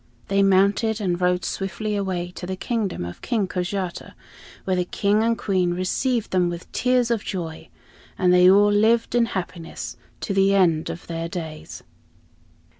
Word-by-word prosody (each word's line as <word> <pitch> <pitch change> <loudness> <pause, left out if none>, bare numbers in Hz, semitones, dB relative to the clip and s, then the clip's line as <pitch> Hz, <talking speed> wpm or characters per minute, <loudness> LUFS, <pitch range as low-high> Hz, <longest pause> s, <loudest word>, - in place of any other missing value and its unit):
They 200 0 +3
mounted 200 +3 +3
and 180 -3 -1
rode 180 0 +1
swiftly 210 +2 -3
away 185 -3 -2
to 180 0 -8
the 190 - -3
kingdom 205 - -2
of 85 - -8
King 220 -6 0
Kojata, 180 0 -4 0.5
where 185 - 0
the 180 - +1
King 200 +4 +1
and 230 0 +1
Queen 180 -3 0
received 225 +6 -1
them 180 -2 +2
with 175 0 -7
tears 250 0 +1
of 225 -3 0
joy, 165 -5 -5 0.5
and 180 -1 +3
they 180 0 +7
all 205 +2 +5
lived 225 +3 +3
in 240 -1 +4
happiness 170 - -6 0.2
to - - -2
the 195 0 +3
end 165 -5 +2
of 170 - -7
their 165 0 -4
days. 160 -3 -7
190 Hz, 165 wpm, -23 LUFS, 175-210 Hz, 0.5 s, they